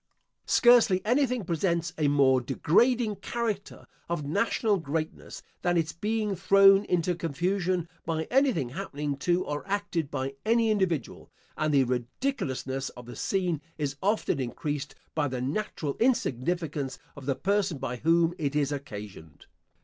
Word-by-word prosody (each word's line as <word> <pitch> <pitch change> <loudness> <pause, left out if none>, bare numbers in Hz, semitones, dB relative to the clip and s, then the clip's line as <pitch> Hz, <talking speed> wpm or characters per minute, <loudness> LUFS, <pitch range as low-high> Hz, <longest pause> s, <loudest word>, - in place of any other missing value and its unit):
Scarcely 240 -6 +5
anything 250 -2 +1
presents 170 -1 0
a 150 -2 +1
more 135 -2 +4
degrading 210 - +2
character 210 -1 -4 0.2
of 170 -4 -2
national 205 +5 +1
greatness, 160 -1 -4 0.2
than 175 -1 +1
its 165 -1 0
being 210 +2 -1
thrown 195 +2 +6
into 180 0 +1
confusion, 175 +2 -1 0.2
by 160 -1 -1
anything 260 - +2
happening 145 -2 -4
to 175 +6 +1
or 145 0 -3
acted 195 -7 -1
by 135 -1 -3
any 230 0 +3
individual; 190 -7 -1 0.2
and 155 0 0
the 140 -2 +5
ridiculousness 130 - -2
of 125 - -9
the 120 - -9
scene 180 -6 -1 0.2
is 145 -2 -2
often 205 -7 +1
increased 140 +3 -4 0.2
by 150 -2 +1
the 130 -2 -3
natural 145 +1 -2
insignificance 160 - 0 0.2
of 140 -2 -10
the 135 - +1
person 195 -3 0
by 125 -1 -4
whom 165 +4 +3
it 145 -2 -1
is 145 -1 +1
occasioned. 105 - -8
165 Hz, 140 wpm, -28 LUFS, 140-200 Hz, 0.2 s, thrown